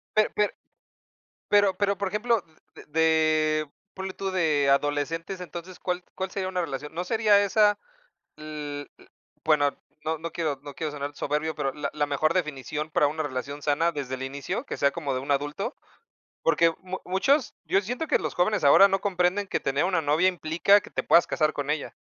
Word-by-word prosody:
Per 215 0 +3
per 210 0 +1 0.9
pero 205 -2 +4
pero, 200 -1 +1
por 200 - -1
ejemplo, 215 +1 +1 0.3
d - - -12
de 155 -1 +2 0.2
ponle 190 0 -5
tú, 195 0 -4
de 155 -6 +2
adolescentes, 145 +6 0
entonces, 180 0 -8
¿cuál 180 0 -3
cuál 190 0 -4
sería 190 -2 -3
una 185 -1 -2
relación? 150 -3 -4
No 175 +2 -2
sería 210 0 +4
esa, 205 +1 +3 0.6
l 150 -2 -6
l - - -19 0.4
bueno, 145 -2 +3 0.3
no 160 +1 0
no 165 0 -6
quiero 155 -5 -2
no 145 -2 -9
quiero 155 -2 -3
sonar 145 0 -5
soberbio, 150 +2 -2
pero 140 -2 -2
la 150 +1 -4
la 150 -1 0
mejor 145 +3 +1
definición 150 -2 -2
para 150 - +3
una 155 +2 -3
relación 140 +1 -5
sana 160 +3 +2
desde 140 -4 -4
el 130 - -6
inicio, 135 +1 -4
que - - -5
sea 140 - +3
como 145 -3 -3
de 130 - -1
un 140 +2 -6
adulto, 145 - -2 0.7
porque 165 +1 +4
mu 185 0 -5
muchos, 260 +10 +1
yo 195 - +2
siento 245 +10 -4
que - - +3
los - - -3
jóvenes 200 +2 +1
ahora 145 +8 +8
no 195 0 +1
comprenden 190 +1 +1
que - - -1
tener 140 +4 +1
una 180 -3 +1
novia 155 +5 +3
implica 180 +3 +3
que - - -13
te - - -2
puedas 170 - +5
casar 155 -2 +1
con 145 0 -4
ella. 150 -1 -2
160 Hz, 195 wpm, -26 LUFS, 145-190 Hz, 0.9 s, ahora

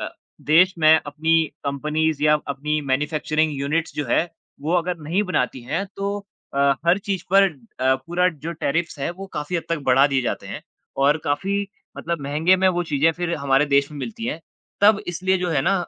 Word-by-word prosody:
अ, - - -3 0.3
देश 180 +5 +4
में 155 0 +6
अपनी 160 +2 +2 0.2
कम्पनीज़ 150 +2 -1
या 150 0 +5
अपनी 150 +2 -2
मैन्युफैक्चरिंग 155 +2 0
यूनिट्स 155 +4 -1
जो 150 - -2
है 165 - +3 0.4
वो 155 +4 -2
अगर 175 0 0
नहीं 170 +7 0
बनाती 150 -9 -1
हैं, 195 +11 -2
तो 200 +1 -2 0.4
अ, 140 - -1 0.3
हर 175 +3 +4
चीज 195 -2 -3
पर 195 0 +7 0.4
अ, 130 +1 +4
पूरा 180 +2 +2
जो 165 0 -6
टेर्रिफ्स 165 0 -2
है 140 - -2
वो 190 +3 -8
काफ़ी 150 +4 -3
हद 165 - -2
तक 165 -2 0
बढ़ा 135 +3 +6
दिए 135 -2 0
जाते 120 - -3
हैं - - -7 0.3
और 140 +2 +3
काफ़ी 195 +8 -1 0.3
मतलब 170 -1 -3
महँगे 150 +6 +2
में 190 0 +3
वो 175 -1 0
चीज़ें 145 -2 -1
या 165 - +4
फिर 175 +1 -2
हमारे 140 +1 +2
देश 140 0 +2
में 150 - -8
मिलती 225 - -6
हैं, 165 -7 -3 0.4
तब 205 0 +6
इसलिए 185 +2 0
जो 180 0 -2
है 145 -4 +2
ना 195 - +2
160 Hz, 200 wpm, -22 LUFS, 145-180 Hz, 0.4 s, पर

